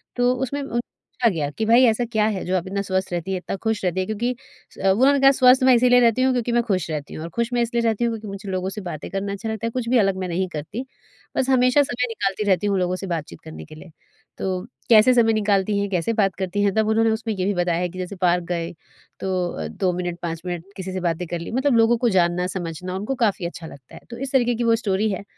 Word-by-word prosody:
तो 245 0 +3
उसमें 265 +3 -3
उन 240 -4 -2
पूछा 240 0 -2
गया 155 -7 -2
कि, 220 +9 -3
"भई, 235 +3 +6
ऐसा 235 +1 +2
क्या 215 -2 +2
है 190 - -4
जो 185 - 0
आप 180 +1 -4
इतना 200 +1 -2
स्वस्थ 190 -1 -2
रहती 175 +2 -3
है, 190 - 0
इतना 180 - -5
खुश 220 -2 0
रहती 180 +1 0
है?" 185 - 0
क्योंकि 235 +5 -2 0.4
स - - -20
वो 195 - +5
उन्होंने 270 +7 +4
कहा, 270 0 +7
"स्वस्थ 260 -1 +5
मैं 260 0 +6
इसीलिए 245 +1 +5
रहती 235 0 +3
हूँ, 260 0 +3
क्योंकि 245 -1 -1
मैं 240 0 +2
खुश 190 -8 -1
रहती 150 -2 -5
हूँ, 155 - -6
और 165 - -6
खुश 235 +1 0
मैं 240 - +2
इसलिए 235 0 0
रहती 225 0 +1
हूँ 235 - +1
क्योंकि 220 -1 -7
मुझे 195 0 -7
लोगों 185 0 -2
से 210 +2 -6
बातें 175 -5 -6
करना 195 +1 -3
अच्छा 215 +3 -5
लगता 220 +1 -3
है, - - -3
कुछ 235 -1 -3
भी 255 - +4
अलग 195 -4 +2
मैं - - -2
नहीं 180 +2 -1
करती। 175 - -6 0.5
बस 260 - +1
हमेशा 255 +1 +4
समय 250 -2 -2
निकालती 200 -2 -2
रहती 190 +1 +2
हूँ 200 -1 +1
लोगों 180 0 0
से 195 +1 -6
बातचीत 165 -4 -4
करने 160 0 -9
के 155 - -13
लिए।" 165 +2 -13 0.5
तो 185 -1 -2 0.3
कैसे 225 +2 +7
समय 230 -2 +4
निकालती 205 -1 +1
हैं, 200 0 -1
कैसे 185 +4 0
बात 195 -4 +1
करती 190 +2 -1
हैं? 200 -1 +2
तब 220 -1 +2
उन्होंने 225 +1 +3
उसमें 220 0 -2
ये 185 -2 -2
भी 205 - +1
बताया 175 -2 0
है 180 - -1
कि 185 +2 -9
जैसे 185 +2 -5
पार्क 180 -1 +2
गए 170 -1 -2 0.5
तो 185 -2 -1
अ, 80 - -5
2 180 - -1
मिनट, 175 -1 -4
5 165 -1 -4
मिनट 175 -1 -4
किसी 190 0 -5
से 185 - -2
बातें 170 +2 -3
कर 175 +1 -4
ली, 170 - -7
मतलब 265 +2 +1
लोगों 230 +1 +4
को 240 +1 +1
जानना-समझना 180 0 -1
उनको 210 +8 -3
काफ़ी 195 -4 -1
अच्छा 170 -1 -6
लगता 135 -5 -14
है। - - -12
तो 235 - -8
इस 265 +1 -5
तरीके 245 -3 +2
की 240 - -2
वो 230 -1 +4
स्टोरी 215 -2 0
है, 195 - -4
200 Hz, 270 wpm, -22 LUFS, 180-235 Hz, 0.5 s, कहा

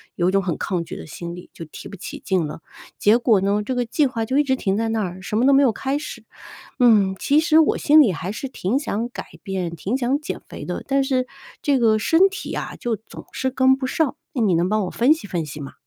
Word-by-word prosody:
有 175 0 +2
一 - - 0
种 195 0 +2
很 180 -3 -2
抗 180 -4 -2
拒 - - -8
的 - - -8
心 170 +2 -7
理， 180 - -12
就 - - -8
提 155 - -10
不 - - -9
起 185 - -8
劲 185 -5 0
了。 150 - -8 0.4
结 210 +3 +4
果 230 -4 +3
呢， 200 +2 +1
这 255 +5 -3
个 245 -1 0
计 285 +5 +2
划 230 -3 -3
就 265 +5 +1
一 - - +4
直 265 -2 +1
停 195 -6 -1
在 225 +1 0
那 225 -1 0
儿， 185 0 -6
什 210 +3 -3
么 240 - +3
都 275 - +5
没 275 - +6
有 265 -5 +4
开 270 +6 -2
始， 300 - -8 0.6
嗯， 210 -6 +4
其 290 +2 +3
实 315 0 +4
我 320 - +3
心 305 +1 +6
里 225 -9 +2
还 175 +3 -5
是 235 +6 -5
挺 250 0 -1
想 235 -5 -3
改 245 - -7 0.2
变、 190 -3 -3
挺 200 +8 -2
想 265 +2 0
减 300 - -5
肥 - - -8
的， - - -4
但 275 0 +2
是 260 -2 0 0.4
这 280 -2 +2
个 220 -2 +3
身 325 - +4
体 395 - -6
啊， - - -5
就 235 -2 -1
总 220 - -12
是 260 - -1
跟 260 0 +4
不 265 -1 -3
上， 290 +2 0 0.2
哎， 245 - 0
你 195 -5 +3
能 170 +2 +2
帮 215 +1 +1
我 180 - -4
分 245 +5 +3
析 275 -10 -9
分 175 -4 -2
析 150 0 -8
吗？ 135 - -7
225 Hz, 285 characters per minute, -22 LUFS, 190-270 Hz, 0.6 s, 没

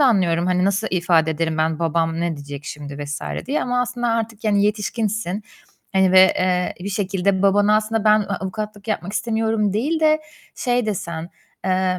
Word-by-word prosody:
da - - +6
anlıyorum. 175 -6 +2
Hani, 180 0 +2
"Nasıl 200 +2 +1
ifade 170 -3 +2
ederim 160 0 -1
ben, 160 0 +1
babam 165 0 0
ne 170 -2 -1
diyecek 145 0 -8
şimdi?" 145 -1 -6
vs. 145 +1 -4 0.3
diye. 285 +3 0
Ama 245 0 0
aslında 245 -1 -2
artık, 225 -1 -2
yani, 205 -1 +3
yetişkinsin. 210 -1 -1 0.5
Hani, 190 -1 +3
ve, 185 - +8 0.2
eee, 180 -1 0
bir 195 - -4
şekilde 195 -1 0
babana 205 +2 +4
aslında, 220 0 -1
"Ben 215 0 +5
a-avukatlık 205 +2 -5
yapmak 195 -2 -2
istemiyorum." 220 -1 0
değil 290 +10 0
de 310 0 +4 0.3
şey 245 -2 0
desen, 170 -5 -4 0.4
eee, 185 0 +1
195 Hz, 170 wpm, -21 LUFS, 170-220 Hz, 0.5 s, ve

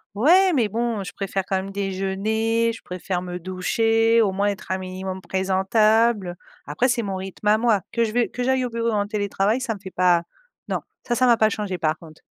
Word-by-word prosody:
ou 220 +7 0
ais, 370 +2 +6
mais 245 -7 +2
bon, 230 -1 -2
je 185 - -7
préfère 195 -1 -3
quand 195 - 0
même 190 +1 -4
déjeuner, 200 +4 0
je - - -12
préfère 180 0 -4
me 180 -1 -5
doucher, 225 +6 +2
au 205 -3 +2
moins 200 +2 0
être 200 - -6
un 190 - +1
minimum 185 0 -5
présentable». 195 +2 +2 0.3
Après 150 - +1
c'est 240 -1 +1
mon 195 -2 -3
rythme 190 +2 -6
à 210 +1 +5
moi 225 -3 +2
que 235 - +1
je 220 - -1
vais 240 +1 +1
que 250 - -4
j'aille 260 0 +1
au - - -3
bureau 230 0 -1
ou - - 0
en 205 -1 0
télétravail 205 +2 0
ça 245 -3 -2
me 205 - -10
fait 190 - -7
pas 180 -2 +3 0.5
non - - -1 0.3
ça 240 - +1
ça 255 - +3
va 235 -1 +5
pas 215 -1 +4
changer, 200 -3 -3
par 155 -1 0
contre. 155 -1 -15
205 Hz, 230 wpm, -23 LUFS, 190-230 Hz, 0.5 s, ais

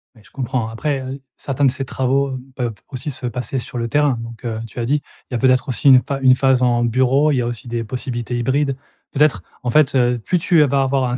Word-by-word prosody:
Ouais, 110 - -19
je - - -22
comprends 125 -3 -2
après, 135 +5 -2
heu, 130 +1 -6 0.2
certains 140 +1 -1
de 130 - +4
ces 135 0 -4
travaux, 135 +1 0
heu, 130 -1 -5 0.2
peuvent 120 -3 -2 0.2
aussi 135 +2 -4
se 125 - -5
passer 125 +2 -3
sur 125 - -6
le 115 0 -1
terrain 145 -1 +2
donc, 115 +1 -9
heu 110 -2 -3
tu 115 +2 -9
as 115 - -1
dit 145 +3 +1 0.3
il - - -9
y - - 0
a - - +1
peut-être 130 +2 +2
aussi 135 +2 +2
une 130 -1 +8
pha 140 +1 -4
une 130 -1 +6
phase 130 -1 +2
en 120 -1 +2
bureau. 130 +5 +3
Il 140 - +1
y - - +2
a - - -2
aussi 120 +2 -5
des 115 -1 -2
possibilités 120 0 -4
hybrides. 135 +3 0 0.3
Peut-être, 140 - +2 0.2
en 125 - -1
fait, 150 -1 +3
heu, 125 -1 +3
plus 180 +11 0
tu 165 -1 +4
vas 140 -1 +2
avoir 130 -1 +1
un 125 - -1
130 Hz, 265 wpm, -19 LUFS, 120-135 Hz, 0.3 s, une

